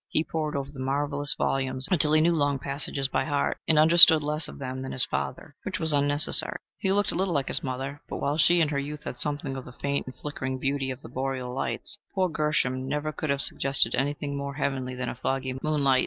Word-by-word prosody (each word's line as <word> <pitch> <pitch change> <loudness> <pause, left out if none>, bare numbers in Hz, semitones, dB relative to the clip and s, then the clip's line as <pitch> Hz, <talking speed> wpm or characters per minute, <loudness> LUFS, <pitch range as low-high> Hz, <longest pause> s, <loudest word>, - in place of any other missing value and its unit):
He 155 - +2
pored 155 -2 -3
over 140 0 -4
the 140 - -11
marvelous 140 +1 -1
volumes 130 -1 -1
until 155 -4 +4
he 155 - +5
knew 170 +2 +3
long 145 -3 +1
passages 140 0 -2
by 135 - -1
heart, 145 -1 -1
and 160 - +4
understood 160 0 +8
less 150 +1 -1
of - - -10
them 130 -1 -5
than 130 - -6
his 130 - 0
father 70 0 -5
which - - -4
was 160 -1 +1
unnecessary. 145 +1 +3 0.2
He 190 - +1
looked 205 +1 +3
a - - -4
little 185 -1 0
like 140 -2 -1
his - - 0
mother, 135 +2 -5
but - - -4
while 140 +1 -1
she 175 +1 +5
in 155 - +2
her 140 -2 -1
youth 145 +1 -6
had - - -6
something 145 -1 -3
of 130 - -6
the 125 - -11
faint 140 +2 -3
and 130 - -8
flickering 130 -3 -5
beauty 135 0 -2
of 130 0 -7
the - - -10
Boreal 130 0 -4
Lights, 170 +9 +1 0.2
poor 185 -2 +1
Gershom 140 -4 -1
never 150 +2 -2
could 155 0 -5
have 140 0 0
suggested 135 -5 +3
anything 145 +1 -2
more 140 0 -5
heavenly 135 -3 -3
than 125 0 -4
a - - -3
foggy 130 +1 -3
moonlight. 140 -4 +2
140 Hz, 230 wpm, -26 LUFS, 130-150 Hz, 0.2 s, understood